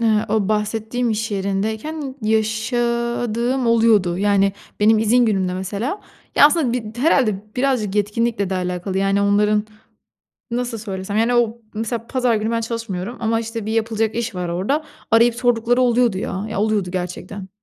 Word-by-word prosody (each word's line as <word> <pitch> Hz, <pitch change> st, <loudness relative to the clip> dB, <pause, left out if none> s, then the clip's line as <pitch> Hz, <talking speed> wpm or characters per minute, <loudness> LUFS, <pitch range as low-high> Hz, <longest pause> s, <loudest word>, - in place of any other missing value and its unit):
Iıı, 220 Hz, -2 st, +2 dB
o 215 Hz, -2 st, +1 dB
bahsettiğim 220 Hz, +3 st, -1 dB
iş 220 Hz, +1 st, -2 dB
yerindeyken 220 Hz, +9 st, -3 dB
yaşadığım 235 Hz, +2 st, 0 dB
oluyordu. 220 Hz, -6 st, +3 dB
Yani, 200 Hz, -1 st, +3 dB, 0.3 s
benim 215 Hz, +1 st, +5 dB
izin 235 Hz, +3 st, +3 dB
günümde 190 Hz, -4 st, 0 dB
mesela 205 Hz, -, -3 dB, 0.3 s
Ya, 290 Hz, -, +8 dB
aslında, 300 Hz, -6 st, +1 dB
bi 225 Hz, -3 st, -4 dB
d -, -, -11 dB
herhâlde 260 Hz, -7 st, +3 dB, 0.2 s
birazcık 250 Hz, -7 st, 0 dB
yetkinlikle 210 Hz, 0 st, 0 dB
de 190 Hz, -, 0 dB
alakalı, 180 Hz, +1 st, -2 dB
yani, 195 Hz, +1 st, +2 dB
onların, 210 Hz, +1 st, +2 dB, 0.9 s
nasıl 240 Hz, -1 st, -2 dB
söylesem, 200 Hz, -1 st, -5 dB
yani, 230 Hz, +2 st, +2 dB
o 235 Hz, -1 st, +2 dB, 0.2 s
mesela 225 Hz, +1 st, -3 dB
pazar 250 Hz, -3 st, +1 dB
günü 215 Hz, +1 st, -1 dB
ben 230 Hz, 0 st, 0 dB
çalışmıyorum 230 Hz, -1 st, -4 dB
ama, 225 Hz, 0 st, +1 dB
işte, 225 Hz, -1 st, -5 dB
bir 220 Hz, -, -2 dB
yapılacak 225 Hz, -1 st, 0 dB
iş 235 Hz, -2 st, -3 dB
var 180 Hz, -1 st, -3 dB
orada. 205 Hz, -, -1 dB, 0.3 s
Arayıp 230 Hz, +1 st, +5 dB
sordukları 245 Hz, 0 st, +2 dB
oluyordu, 240 Hz, -5 st, +3 dB
ya. 195 Hz, +2 st, -3 dB
Ya, 215 Hz, -, -2 dB
oluyordu 210 Hz, -4 st, 0 dB
gerçekten. 185 Hz, +2 st, -5 dB
220 Hz, 155 wpm, -20 LUFS, 200-235 Hz, 0.9 s, Ya